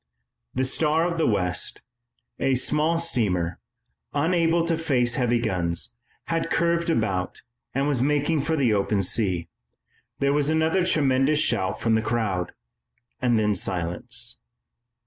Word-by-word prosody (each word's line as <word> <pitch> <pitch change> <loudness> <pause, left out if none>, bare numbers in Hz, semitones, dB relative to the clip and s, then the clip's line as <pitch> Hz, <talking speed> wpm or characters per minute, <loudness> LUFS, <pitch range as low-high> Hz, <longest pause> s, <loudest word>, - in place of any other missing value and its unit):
The 130 - +1
Star 155 +4 +1
of 170 -1 -2
the - - +2
West, 90 -5 0 0.6
a 135 -1 +2
small 150 +5 +1
steamer, 100 - 0 0.6
unable 165 +2 +2
to 165 -1 +1
face 130 -7 +1
heavy 120 -2 +2
guns, 90 -7 -1 0.3
had 165 0 -2
curved 170 0 +1
about 100 - -1 0.3
and 135 +1 +1
was 140 -5 0
making 145 +2 +1
for 160 +3 -1
the 130 -7 +2
open 100 0 +1
sea. 90 -3 0 0.7
There 140 0 +1
was 145 0 +1
another 160 +3 +2
tremendous 140 -2 +2
shout 95 -9 +1
from 115 - +1
the 110 - +3
crowd, 110 -6 -1 0.7
and 120 -2 +2
then 105 -1 +2
silence. 100 +5 -1
130 Hz, 135 wpm, -24 LUFS, 105-160 Hz, 0.7 s, the